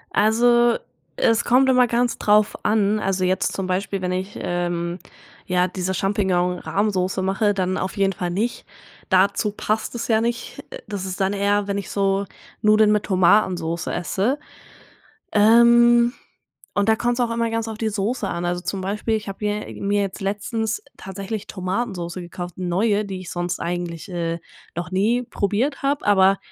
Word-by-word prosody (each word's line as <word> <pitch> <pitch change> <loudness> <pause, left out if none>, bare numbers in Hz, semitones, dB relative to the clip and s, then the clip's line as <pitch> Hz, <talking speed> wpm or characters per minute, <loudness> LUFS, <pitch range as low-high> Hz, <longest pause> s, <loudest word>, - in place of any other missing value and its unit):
Also, 240 +2 +4 0.4
es 230 +1 +3
kommt 255 +2 +4
immer 250 -1 +5
ganz 240 +1 0
drauf 210 0 +3
an. 210 0 +2
Also, 190 -2 0
jetzt 185 +1 +1
zum 190 -1 -3
Beispiel 195 +1 -2
wenn 180 0 -1
ich, 190 +2 -4
ähm, 175 0 -2 0.5
ja 180 0 +2
diese 185 +1 -3
Champignon-Rahmsoße 190 0 0
mache, 195 +2 +1
dann 185 -1 -1
auf 190 - -3
jeden 195 -1 +2
Fall 175 -1 -3
nicht. 220 +6 -2 0.4
Dazu 200 +2 +3
passt 215 +2 -2
es 235 - -3
ja 220 -1 +3
nicht. 235 0 -3
Äh, - - -7
das 200 -2 -4
ist 185 0 -5
dann 195 +1 +1
eher, 200 0 +1
wenn 200 0 -1
ich 200 - -5
so 195 0 +1 0.4
Nudeln 215 0 +5
mit 210 - +1
Tomatensoße 180 -3 +2
esse. 210 +10 -1 0.9
Ähm, 235 +2 +6 0.6
und 205 +1 +1
da 220 - +4
kommt's 240 +1 0
auch 240 -1 +1
immer 230 0 0
ganz 230 0 -1
auf 220 - -6
die 220 - 0
Soße 210 +1 -2
an. 170 -1 -3
Also, 175 0 -1
zum 195 -1 -3
Beispiel, 210 +4 -1
ich 215 - -6
habe 195 - -6
hier 210 0 -4
mir 200 +1 +1
jetzt 195 -1 -4
letztens 210 +3 -2 0.2
tatsächlich 195 +2 -6
Tomatensoße 185 -2 -3
gekauft, 175 0 -7
neue, 200 +4 +1
die 190 -1 -5
ich 180 -1 -8
sonst 175 0 -2
eigentlich, 175 +1 -4
äh, 170 -1 -2 0.4
noch 175 +1 -4
nie 220 +6 +1
probiert 225 +8 -1
habe. 280 +1 0
Aber 195 -1 +5
200 Hz, 165 wpm, -22 LUFS, 185-220 Hz, 0.9 s, Ähm